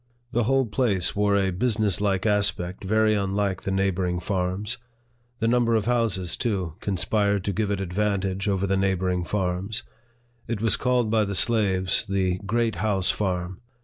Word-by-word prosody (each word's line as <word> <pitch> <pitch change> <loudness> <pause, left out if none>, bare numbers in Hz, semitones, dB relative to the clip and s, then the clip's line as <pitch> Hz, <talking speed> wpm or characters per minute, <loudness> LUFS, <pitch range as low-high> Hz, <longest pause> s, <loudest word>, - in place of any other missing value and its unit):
The 120 -1 +1
whole 135 +2 +3
place 105 -6 0
wore 100 0 +2
a 95 -1 +1
business 105 0 +1
like 100 -1 0
aspect 100 -4 0
very 110 +2 +3
unlike 100 -1 -1
the 95 - -3
neighboring 95 -2 0
farms. 95 +5 -2 0.6
The 115 - 0
number 115 -1 +3
of 110 - +1
houses, 110 -7 0
too, 95 -8 -2
conspired 100 0 0
to 100 - -1
give 105 +2 -1
it 100 -1 -1
advantage 95 0 -1
over 100 -1 +1
the 95 0 +1
neighboring 95 -2 0
farms. 95 +2 -2 0.6
It 115 -2 -2
was 110 0 +2
called 125 -3 +1
by 110 -1 +3
the 100 0 -3
slaves 95 -4 +2
the 95 -2 0
Great 115 -2 0
House 100 -1 +1
Farm. 95 -1 -3
100 Hz, 160 wpm, -25 LUFS, 95-110 Hz, 0.6 s, whole